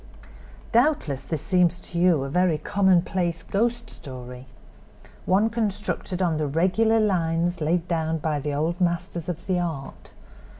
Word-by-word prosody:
"Doubtless 230 Hz, -, +1 dB
this 160 Hz, -4 st, -3 dB
seems 180 Hz, -2 st, +2 dB
to 170 Hz, -, -4 dB
you 170 Hz, -6 st, +4 dB
a 135 Hz, -, -4 dB
very 180 Hz, -1 st, +2 dB
commonplace 175 Hz, -1 st, +1 dB
'ghost 235 Hz, +5 st, -1 dB
story'—one 130 Hz, -, -5 dB
constructed 205 Hz, -4 st, -2 dB
on 165 Hz, -3 st, +1 dB
the 155 Hz, -1 st, -1 dB
regular 190 Hz, +9 st, +2 dB
lines 175 Hz, -4 st, 0 dB
laid 165 Hz, +3 st, 0 dB
down 160 Hz, -2 st, 0 dB
by 155 Hz, -1 st, -1 dB
the 145 Hz, +1 st, -3 dB
old 160 Hz, +5 st, -1 dB
masters 170 Hz, -1 st, -1 dB
of 175 Hz, -, -5 dB
the 185 Hz, -2 st, 0 dB
art. 160 Hz, -6 st, -5 dB
175 Hz, 135 wpm, -25 LUFS, 155-190 Hz, -, you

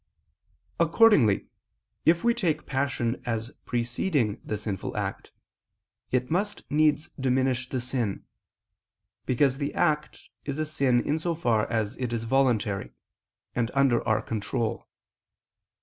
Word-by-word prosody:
Accordingly 165 Hz, -, +5 dB, 0.6 s
if 170 Hz, +1 st, +4 dB
we 235 Hz, -, +4 dB
take 170 Hz, -10 st, -1 dB
passion 130 Hz, -3 st, -1 dB
as 115 Hz, -1 st, -3 dB
preceding 120 Hz, -, 0 dB
the 105 Hz, -, -3 dB
sinful 105 Hz, -2 st, -4 dB
act, -, -, -4 dB, 0.8 s
it 125 Hz, +1 st, 0 dB
must 205 Hz, +5 st, -1 dB
needs 150 Hz, 0 st, +2 dB
diminish 130 Hz, -1 st, +1 dB
the 130 Hz, -, -2 dB
sin: 120 Hz, -5 st, -2 dB, 1.0 s
because 135 Hz, +1 st, +2 dB
the 145 Hz, 0 st, -3 dB
act 150 Hz, -3 st, 0 dB, 0.2 s
is 140 Hz, -1 st, -4 dB
a 155 Hz, -, 0 dB
sin 135 Hz, -5 st, +2 dB
in 150 Hz, +2 st, +1 dB
so 170 Hz, +1 st, -1 dB
far 115 Hz, -9 st, +1 dB
as 110 Hz, -2 st, -1 dB
it 125 Hz, -2 st, -3 dB
is 115 Hz, -1 st, -2 dB
voluntary, 115 Hz, -5 st, +1 dB, 0.6 s
and 115 Hz, -1 st, 0 dB
under 135 Hz, -4 st, +3 dB
our 110 Hz, -, +2 dB
control. 110 Hz, +1 st, -2 dB
130 Hz, 125 wpm, -27 LUFS, 115-150 Hz, 1.0 s, Accordingly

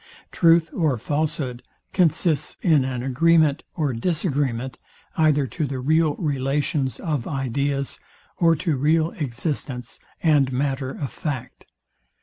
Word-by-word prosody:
Truth 165 Hz, -1 st, +4 dB
or 155 Hz, -7 st, +1 dB
falshood 145 Hz, -1 st, -2 dB, 0.3 s
consists 165 Hz, -4 st, +1 dB
in 155 Hz, -7 st, +4 dB
an 130 Hz, -2 st, -3 dB
agreement 155 Hz, +3 st, +3 dB
or 150 Hz, -6 st, 0 dB
disagreement 135 Hz, -, -1 dB, 0.4 s
either 150 Hz, -3 st, +3 dB
to 150 Hz, +3 st, -3 dB
the 135 Hz, 0 st, -4 dB
real 155 Hz, +3 st, +2 dB
relations 140 Hz, -1 st, -1 dB
of 150 Hz, -8 st, -2 dB
ideas, 140 Hz, +1 st, -2 dB, 0.4 s
or 165 Hz, -1 st, +4 dB
to 155 Hz, -2 st, -1 dB
real 160 Hz, +4 st, +2 dB
existence 130 Hz, -2 st, -4 dB, 0.2 s
and 145 Hz, -5 st, +4 dB
matter 135 Hz, 0 st, -1 dB
of 135 Hz, 0 st, -5 dB
fact. 145 Hz, -8 st, -5 dB
145 Hz, 120 wpm, -23 LUFS, 130-160 Hz, 0.4 s, Truth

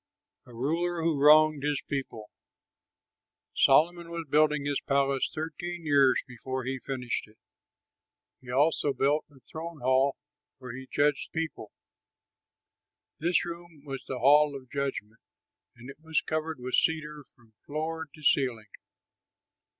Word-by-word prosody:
A -, -, -14 dB
RULER 165 Hz, +7 st, -1 dB
WHO 160 Hz, -3 st, +1 dB
WRONGED 155 Hz, 0 st, +6 dB
HIS 145 Hz, -1 st, -1 dB
PEOPLE 130 Hz, -7 st, -5 dB, 1.2 s
Solomon 170 Hz, +5 st, +4 dB
was 170 Hz, -1 st, -5 dB
building 150 Hz, 0 st, +2 dB
his 145 Hz, -1 st, -1 dB
palace 140 Hz, -1 st, +1 dB
thirteen 165 Hz, +2 st, -5 dB
years 140 Hz, -3 st, +4 dB
before 130 Hz, +1 st, -5 dB
he 130 Hz, +1 st, -3 dB
finished 125 Hz, -4 st, -4 dB
it. 110 Hz, +1 st, -23 dB, 1.0 s
He 125 Hz, -, -15 dB
also 145 Hz, +2 st, +2 dB
built 145 Hz, +4 st, +1 dB
the 140 Hz, -2 st, -20 dB
throne 160 Hz, +2 st, -8 dB
hall 130 Hz, +2 st, +3 dB, 0.4 s
where 125 Hz, -3 st, -9 dB
he 130 Hz, 0 st, -9 dB
judged 145 Hz, 0 st, +1 dB
the 160 Hz, -, -3 dB
people. 155 Hz, -10 st, -5 dB, 1.5 s
This 175 Hz, +3 st, +1 dB
room 170 Hz, -3 st, -9 dB
was 135 Hz, -2 st, -6 dB
the 130 Hz, -, -4 dB
Hall 145 Hz, +2 st, +5 dB
of 130 Hz, -2 st, -10 dB
Judgment; 135 Hz, -6 st, -4 dB, 0.6 s
and 120 Hz, +1 st, -13 dB
it 140 Hz, -, -11 dB
was 160 Hz, -1 st, 0 dB
covered 155 Hz, -2 st, -3 dB
with 125 Hz, 0 st, -6 dB
cedar 150 Hz, -2 st, 0 dB
from 115 Hz, -3 st, -25 dB
floor 160 Hz, +2 st, -3 dB
to 155 Hz, -, -15 dB
ceiling. 120 Hz, -8 st, +1 dB
145 Hz, 135 wpm, -28 LUFS, 130-155 Hz, 1.5 s, WRONGED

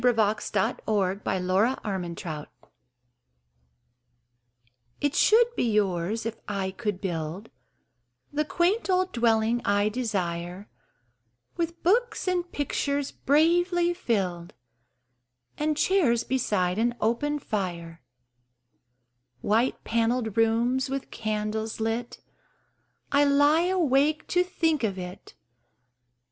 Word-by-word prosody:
Christopher 215 Hz, -4 st, +1 dB
Morley 200 Hz, -2 st, 0 dB
Our 190 Hz, +7 st, +1 dB
House 170 Hz, -6 st, -4 dB, 2.5 s
IT 290 Hz, -1 st, 0 dB
should 475 Hz, +2 st, +4 dB
be 235 Hz, -, +1 dB
yours, 205 Hz, +1 st, 0 dB
if 230 Hz, 0 st, -3 dB
I 195 Hz, -2 st, -2 dB
could 205 Hz, -1 st, -3 dB
build 175 Hz, +2 st, -4 dB, 0.8 s
The 300 Hz, +1 st, +1 dB
quaint 355 Hz, +8 st, 0 dB
old 370 Hz, 0 st, +2 dB
dwelling 230 Hz, 0 st, +2 dB
I 205 Hz, +1 st, +2 dB
desire, 190 Hz, -5 st, -3 dB, 0.9 s
With 335 Hz, 0 st, -3 dB
books 465 Hz, +3 st, +1 dB
and 355 Hz, -1 st, -1 dB
pictures 285 Hz, 0 st, -1 dB
bravely 345 Hz, +4 st, +2 dB
filled 185 Hz, -, -2 dB, 1.0 s
And 300 Hz, 0 st, -1 dB
chairs 300 Hz, -12 st, +2 dB
beside 205 Hz, -7 st, 0 dB
an 240 Hz, +1 st, +1 dB
open 290 Hz, +7 st, 0 dB
fire, 175 Hz, -, -4 dB, 1.4 s
White 230 Hz, +5 st, +1 dB
panelled 230 Hz, -1 st, 0 dB
rooms 235 Hz, +4 st, +2 dB
with 275 Hz, 0 st, -4 dB
candles 215 Hz, 0 st, -3 dB
lit 225 Hz, +2 st, -3 dB, 0.9 s
I 285 Hz, 0 st, +4 dB
lie 290 Hz, +4 st, +4 dB
awake 305 Hz, -4 st, +2 dB
to 360 Hz, 0 st, +3 dB
think 325 Hz, -6 st, 0 dB
of 200 Hz, -4 st, -1 dB
it! 180 Hz, 0 st, -9 dB
230 Hz, 100 wpm, -26 LUFS, 200-295 Hz, 2.5 s, should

